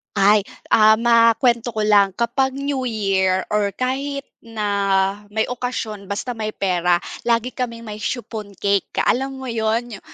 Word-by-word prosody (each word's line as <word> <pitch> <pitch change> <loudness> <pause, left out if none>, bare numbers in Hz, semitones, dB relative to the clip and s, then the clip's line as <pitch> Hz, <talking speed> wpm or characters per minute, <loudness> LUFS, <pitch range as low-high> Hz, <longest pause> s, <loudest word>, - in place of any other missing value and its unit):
Ay, 205 0 +4 0.3
ah, 215 0 +6
makuwento 230 0 +3
ko 215 - 0
lang 200 -3 +4
kapag 260 +4 0
New 275 -2 -2
Year 190 -4 +1
or 205 -1 +1
kahit 275 +2 -2
na 220 -3 -4 0.6
may 220 0 +2
okasyon 235 -5 -4
basta 205 +5 -3
may 215 -2 -4
pera, 180 -2 +1 0.2
lagi 235 +1 +1
kaming 235 -2 -4
may 210 -2 -7
chiffon 215 -2 -5
cake. 200 +1 +1
Ka - - +1
alam 270 +2 0
mo 265 -1 -7
'yun, 225 0 -1
yu - - -15
225 Hz, 155 wpm, -21 LUFS, 205-245 Hz, 0.6 s, ah